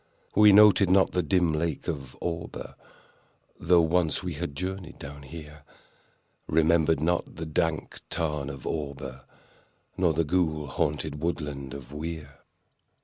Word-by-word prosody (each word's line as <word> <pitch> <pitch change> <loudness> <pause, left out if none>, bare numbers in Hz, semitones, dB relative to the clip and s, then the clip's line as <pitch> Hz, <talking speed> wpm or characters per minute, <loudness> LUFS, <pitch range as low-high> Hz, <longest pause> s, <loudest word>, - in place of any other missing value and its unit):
We 105 0 +7
noted 100 -1 +7
not 95 +1 +4
the 90 - +1
dim 85 0 +2
lake 80 +1 -2
of 70 -6 -5
Auber, 85 -1 -5 0.9
(Though 85 0 +5
once 85 0 +1
we 90 -2 -3
had 75 -1 -5
journeyed 90 +1 -5
down 70 +1 -9
here) 75 0 -10 0.9
We - - -3
remembered 80 -1 +4
not 85 +3 0
the 80 - -5
dank 80 0 -2
tarn 75 -4 -1
of 70 -2 -8
Auber, 70 -4 -5 0.7
Nor 90 -3 +3
the 85 - +2
ghoul 80 -2 0
haunted 75 +1 -2
woodland 75 -5 -3
of 70 0 -10
Weir. 75 -2 -6
80 Hz, 140 wpm, -27 LUFS, 75-85 Hz, 0.9 s, We